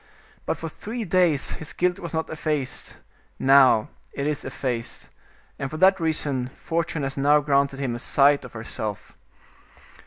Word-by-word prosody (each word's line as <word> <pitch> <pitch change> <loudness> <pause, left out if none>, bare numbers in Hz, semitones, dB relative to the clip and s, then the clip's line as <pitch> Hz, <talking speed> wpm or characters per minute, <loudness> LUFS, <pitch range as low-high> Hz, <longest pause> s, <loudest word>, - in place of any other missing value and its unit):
But - - 0
for 165 - -5
three 220 +7 -6
days 175 -5 +2
his 155 - -6
guilt 180 0 0
was 170 -2 -6
not 160 0 -2
effaced; 150 -4 -2 0.4
now 130 -5 +5 0.2
it 140 - -3
is 150 -1 -1
effaced, 125 -3 -4 0.5
and 140 - -3
for 155 - -6
that 190 +2 +5
reason 145 -6 0
Fortune 165 -2 -2
has 135 0 -3
now 145 +2 +4
granted 140 -1 +1
him 130 -4 -1
a 120 - -5
sight 140 +3 +4
of 130 - -11
herself." 110 -2 -6
145 Hz, 155 wpm, -24 LUFS, 135-160 Hz, 0.5 s, now